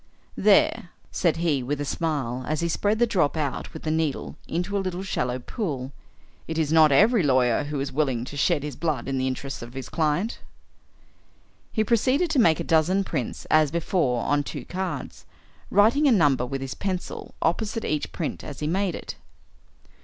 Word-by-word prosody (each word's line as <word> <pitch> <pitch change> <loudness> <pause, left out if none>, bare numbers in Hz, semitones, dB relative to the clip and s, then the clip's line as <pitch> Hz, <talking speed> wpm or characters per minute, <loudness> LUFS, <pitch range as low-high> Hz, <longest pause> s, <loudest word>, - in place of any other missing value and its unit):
"There," - - +3 0.2
said - - +1
he, 160 -5 +1
with 140 +3 -3
a 145 - -2
smile, 135 -6 -2
as 155 +1 -1
he 170 - +1
spread 205 +6 +1
the 240 - +4
drop 175 -9 +1
out 145 -4 -3
with 160 - -9
the 155 - -1
needle 160 -3 -1
into 180 +4 -2
a 200 - +1
little 185 0 -3
shallow 125 -9 -1
pool, 135 - -4 0.6
"it 160 - -3
is 160 -1 +1
not 155 -2 +6
every 215 - +5
lawyer 130 -4 +2
who 145 -1 -3
is 135 0 -3
willing 130 -4 0
to 145 - -8
shed 145 +1 +1
his 145 -3 -5
blood 150 -7 -2
in 135 -1 -1
the 130 - 0
interests 135 +1 -4
of 120 +2 -9
his 135 - -6
client." 160 +7 0 1.3
He 220 - +1
proceeded 255 - +2
to 285 - +2
make 165 -9 +4
a - - -1
dozen 165 +5 +2
prints 140 -10 -4
as 155 -1 +5
before 160 -6 0
on 145 0 +2
two 145 - -6
cards, 185 +1 -5 0.4
writing 235 +9 +4
a - - +5
number 145 - +3
with 135 +1 -4
his 135 -1 -4
pencil 185 -2 -5
opposite 215 +6 -1
each 150 -1 -2
print 160 - -4
as 145 - -8
he 150 - -3
made 185 +2 0
it. - - -7
155 Hz, 190 wpm, -25 LUFS, 135-185 Hz, 1.3 s, not